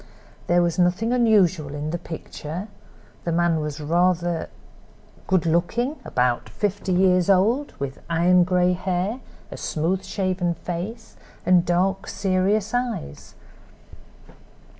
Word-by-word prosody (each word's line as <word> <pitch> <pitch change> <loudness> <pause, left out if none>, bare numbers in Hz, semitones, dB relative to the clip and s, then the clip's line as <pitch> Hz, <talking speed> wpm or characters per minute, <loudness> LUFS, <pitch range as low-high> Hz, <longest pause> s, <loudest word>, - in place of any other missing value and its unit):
There 175 0 +4
was 170 +1 -1
nothing 180 +7 +2
unusual 190 - +3
in 150 +1 -3
the 175 - -3
picture; 165 +4 -7 0.5
the 170 - -2
man 170 -1 +2
was 150 -1 -3
evidently 150 +1 -5
rather 175 -1 +1 0.8
good 185 -4 +2
looking, 225 - 0
about 125 -1 0
fifty 205 -2 -2
years 180 0 +3
old, 220 +10 +3
with 140 -1 -5
iron 175 +2 +4
gray 180 0 +2
hair, 185 +6 -2 0.3
a - - -7
smooth 175 +5 -1
shaven 185 -3 -1
face 195 +8 -6 0.3
and 180 -1 +4
dark, 185 +2 +1
serious 200 +2 0
eyes. 240 - -3
180 Hz, 120 wpm, -23 LUFS, 170-195 Hz, 0.8 s, There